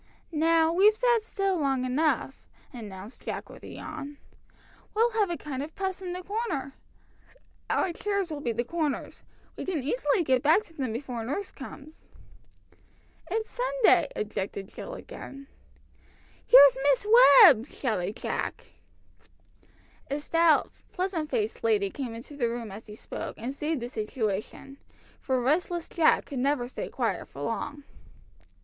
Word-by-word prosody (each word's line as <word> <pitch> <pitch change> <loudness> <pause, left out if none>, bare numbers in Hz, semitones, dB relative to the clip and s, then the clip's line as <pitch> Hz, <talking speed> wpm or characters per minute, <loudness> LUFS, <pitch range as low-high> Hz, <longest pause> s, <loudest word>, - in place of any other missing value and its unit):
"Now 325 +1 +3
we've 410 +4 +5
sat 480 0 +3
still 390 -4 -1
long 270 -3 0
enough," 270 0 0 0.3
announced 210 -2 -9
Jack - - -5
with - - -13
a - - -10
yawn. 285 +1 -8 0.8
"We'll 460 +2 +3
have 425 -3 +1
a 345 - -2
kind 275 -3 -5
of 305 +3 -7
'Puss 380 -1 -3
in 360 -1 -4
the 365 0 -6
Corner.' 390 - -3 1.0
Our 355 - +1
chairs 400 -2 -2
will 295 -2 -5
be 240 - -1
the 235 +1 -1
corners. 310 0 -3 0.3
We - - -6
can 340 -8 -2
easily 435 - +1
get 260 -4 +2
back 320 +9 +4
to 335 - -19
them 265 -7 -3
before 240 -1 -4
nurse 290 - -4
comes." 295 +3 -11 1.2
"It's 445 0 -1
Sunday," - - +3
objected 200 -2 -4
Jill - - -7
again. 275 - -10 1.0
"Here's 275 +1 +9
Miss 280 +8 +2 0.4
Webb!" 270 - +7
shouted 215 -9 -2
Jack. - - -4 1.4
A 285 +2 -1
stout, 330 +1 +3 0.2
pleasant 360 -5 -2
faced 435 +3 -2
lady 415 -4 +2
came 250 -5 -5
into 240 +6 -10
the 240 -5 0
room 230 -3 -5
as 210 +4 -10
he 210 - -9
spoke, - - -7
and 245 +5 -4
saved 300 -1 -2
the - - -3
situation, 220 +3 -4 0.4
for 260 -2 0
restless 330 +6 0
Jack 330 -3 +3
could 275 - -5
never 265 -2 +1
stay - - -6
quiet - - -2
for - - -9
long. 290 0 -4
295 Hz, 150 wpm, -28 LUFS, 255-375 Hz, 1.4 s, Here's